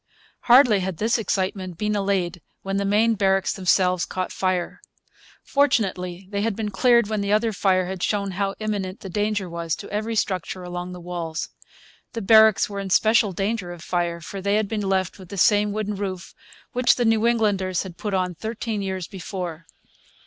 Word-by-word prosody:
Hardly 245 -4 +6
had 185 -2 -3
this 225 +5 +1
excitement 190 -4 -2
been 210 +2 -1
allayed 195 -3 -1 0.2
when 195 0 -2
the 200 - 0
main 215 +3 +3
barracks 195 -2 +1
themselves 185 -1 +2
caught 185 -1 -3
fire. 185 -2 -2 0.6
Fortunately 195 -10 0
they 200 -1 -1
had 220 -1 0
been 210 -1 -3
cleared 235 +2 +4
when 215 -1 -1
the 200 0 -1
other 215 +1 +2
fire 185 -2 +2
had 185 0 -5
shown 200 -1 0
how 195 +1 -2
imminent 205 -3 -3
the 190 - -7
danger 205 -1 -1
was 170 -2 -3
to 205 - -9
every 220 +2 -2
structure 185 -3 -2
along 180 0 -5
the 180 - -8
walls. 170 -2 -4 0.6
The 230 - -4
barracks 220 0 +6
were 200 -1 -6
in 195 -1 -4
special 220 +1 +4
danger 195 0 -2
of 175 -1 -9
fire, 175 -1 -1
for 195 +5 -7
they 200 +1 +1
had 215 -1 +1
been 215 0 -2
left 190 -1 -1
with 185 -3 -12
the 200 - -7
same 205 +3 +4
wooden 210 0 -2
roof 190 -3 -5 0.4
which 250 0 +4
the 245 - 0
New 225 0 +3
Englanders 200 -6 +1
had 180 -3 -10
put 205 -2 -2
on 180 -1 0
thirteen 220 +2 -4
years 190 -2 -3
before. 175 -3 -6
195 Hz, 185 wpm, -23 LUFS, 185-215 Hz, 0.6 s, Hardly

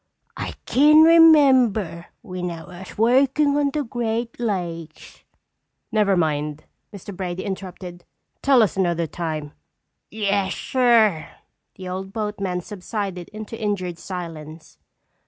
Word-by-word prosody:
I - - -5
kin 300 +4 +6
remember 260 - +5 0.2
when 180 -4 -5
I 165 -1 -7
was 180 +1 -11
workin' 270 +5 +3
on 290 -1 +2
the 295 +1 -2
Great 235 -1 -3
Lakes—" 170 -8 -5 0.7
"Never 210 -4 +2
mind!" 150 -2 -1 0.3
Mr. 200 -1 -9
Brady 180 -1 -4
interrupted. 185 -2 -7 0.4
"Tell 270 -4 +5
us 210 - -1
another 170 -3 0
time!" 155 -2 -5 0.6
"Yes, 200 -2 -1
sir." 225 -10 +2 0.5
The 185 - -9
old 190 +1 -6
boatman 205 -4 -3
subsided 190 -1 -5
into 215 +1 -8
injured 185 -5 -2
silence. 165 -4 -8
195 Hz, 115 wpm, -22 LUFS, 175-230 Hz, 0.7 s, kin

